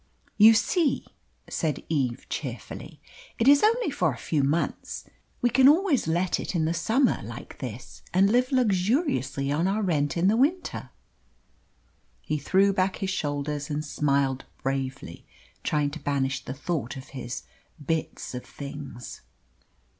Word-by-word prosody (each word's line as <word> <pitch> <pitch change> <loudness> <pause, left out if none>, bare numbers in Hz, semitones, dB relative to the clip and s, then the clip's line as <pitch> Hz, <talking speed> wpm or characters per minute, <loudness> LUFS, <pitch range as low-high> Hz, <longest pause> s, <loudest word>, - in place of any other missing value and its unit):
"You 220 +1 +8
see," 325 - +1 0.4
said 155 -4 -2
Eve 130 -6 -1
cheerfully, - - -6 0.4
"it 230 - +1
is 285 0 +8
only 460 +3 +3
for - - +1
a - - -7
few 150 -4 0
months. 150 +5 -1 0.4
We 245 - +4
can 265 +2 +7
always 315 - +3
let 175 +3 +1
it - - -4
in 160 -2 +2
the 165 - +1
summer 225 - +2
like 120 +3 -9
this, 120 -2 -7
and 190 +2 +4
live 250 +3 +2
luxuriously 190 - +1
on 160 +5 +1
our 210 +3 0
rent 150 -5 0
in 175 +3 +3
the 210 - +4
winter." 300 +10 0 1.3
He 155 0 -1
threw 195 +7 +3
back 185 0 +1
his 190 -1 -2
shoulders 145 -3 -2
and 150 +1 -2
smiled 140 -3 0 0.2
bravely, 135 -8 -3 0.4
trying 150 -2 +1
to 160 - -7
banish 135 -2 -1
the 130 - -5
thought 145 -3 -3
of 130 - -10
his 125 -3 -6 0.4
"bits 160 -2 -2
of 125 - -5
things." 140 -3 -8
160 Hz, 145 wpm, -26 LUFS, 140-215 Hz, 1.3 s, You